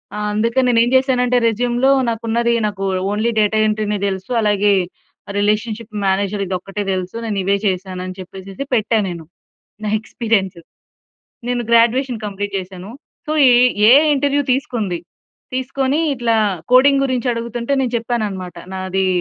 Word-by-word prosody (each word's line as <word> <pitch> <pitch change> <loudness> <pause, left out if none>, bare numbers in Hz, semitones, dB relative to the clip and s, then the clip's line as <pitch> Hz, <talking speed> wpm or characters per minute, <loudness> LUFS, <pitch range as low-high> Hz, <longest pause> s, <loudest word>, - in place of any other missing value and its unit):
ఆ! - - -4
అందుకే 230 +4 +1
నేను 240 -2 +3
ఏమి 240 - -1
చేశాను 260 -1 +1
అంటే 250 0 +2
రెస్యూమ్‌లో 245 +4 +1 0.2
నాకు 230 0 -4
ఉన్నది 235 +1 +1
నాకు 200 -2 -5 0.3
ఓన్లీ 220 +3 0
డేటా 215 +1 +2
ఎంట్రీ‌నే 210 -1 -1
తెలుసు, 190 +3 -5
అలాగే 205 -1 +2 0.7
రిలేషన్‌షిప్ 215 +1 -1
మేనేజర్ 200 +1 0
ఇది 185 - -2
ఒక్కటే 195 +2 -5
తెలుసు. 185 +2 -4
నేను 210 -3 -2
ఇవే 200 +1 +2
చేశాను 185 -1 -3
అని 185 - -8
చెప్పేసి 190 +6 -8
పెట్టా 220 0 +1
నేను, 170 -2 -7 0.6
నా 210 - -1
ఎక్స్‌పీ‌రియన్స్. 215 -6 -1 0.9
నేను 245 -1 0
గ్రాడ్యుయేషన్ 235 +1 +3
కంప్లీట్ 205 0 -5
చేశాను. 185 +2 -9 0.4
సో - - -2 0.2
ఈ - - +7 0.4
ఏఐ 285 +5 +7
ఇంటర్‌వ్యూ 285 +1 +1
తీసుకుంది. 220 -9 -2 0.6
తీసుకోని 270 +3 -1
ఇట్లా 235 -3 0 0.4
కోడింగ్ 275 +2 +5
గురించి 255 -2 -1
అడుగుతుంటే 235 +3 -3
నేను 250 -3 -1
చెప్పానన్నమాట. 210 -6 -3 0.2
నాది, 190 0 -1
220 Hz, 145 wpm, -18 LUFS, 195-245 Hz, 0.9 s, ఈ